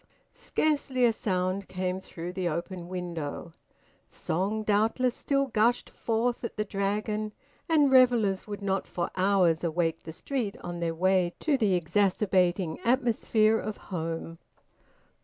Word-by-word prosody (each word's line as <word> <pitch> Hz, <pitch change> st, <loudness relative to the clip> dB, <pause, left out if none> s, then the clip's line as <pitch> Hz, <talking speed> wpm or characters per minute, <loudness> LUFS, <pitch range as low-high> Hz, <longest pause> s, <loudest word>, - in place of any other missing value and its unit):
Scarcely 280 Hz, -5 st, 0 dB
a 230 Hz, -, +4 dB
sound 185 Hz, -1 st, -1 dB
came 185 Hz, 0 st, -2 dB
through 175 Hz, -1 st, -7 dB
the 180 Hz, -2 st, -1 dB
open 170 Hz, +2 st, -4 dB
window; 170 Hz, -3 st, -5 dB, 0.5 s
song 200 Hz, +6 st, -2 dB
doubtless 220 Hz, +4 st, +2 dB
still 275 Hz, +1 st, 0 dB
gushed 235 Hz, -1 st, +1 dB
forth 235 Hz, +2 st, -1 dB
at 235 Hz, -, -5 dB
the 210 Hz, -, 0 dB
Dragon, 210 Hz, +2 st, -2 dB, 0.4 s
and 295 Hz, -4 st, +4 dB
revellers 240 Hz, -7 st, +4 dB
would 205 Hz, -1 st, -6 dB
not 195 Hz, 0 st, -1 dB
for 175 Hz, -1 st, -3 dB
hours 185 Hz, -4 st, +3 dB
awake 165 Hz, -1 st, 0 dB
the 160 Hz, -, -8 dB
street 225 Hz, -, -3 dB
on 175 Hz, -1 st, -5 dB
their 165 Hz, -1 st, -1 dB
way 185 Hz, 0 st, +2 dB
to 305 Hz, -3 st, +2 dB
the 215 Hz, -8 st, +2 dB
exacerbating 180 Hz, -1 st, +1 dB
atmosphere 230 Hz, -3 st, +2 dB
of 215 Hz, -1 st, -5 dB
home. 165 Hz, -2 st, -5 dB
195 Hz, 135 wpm, -28 LUFS, 175-225 Hz, 0.5 s, a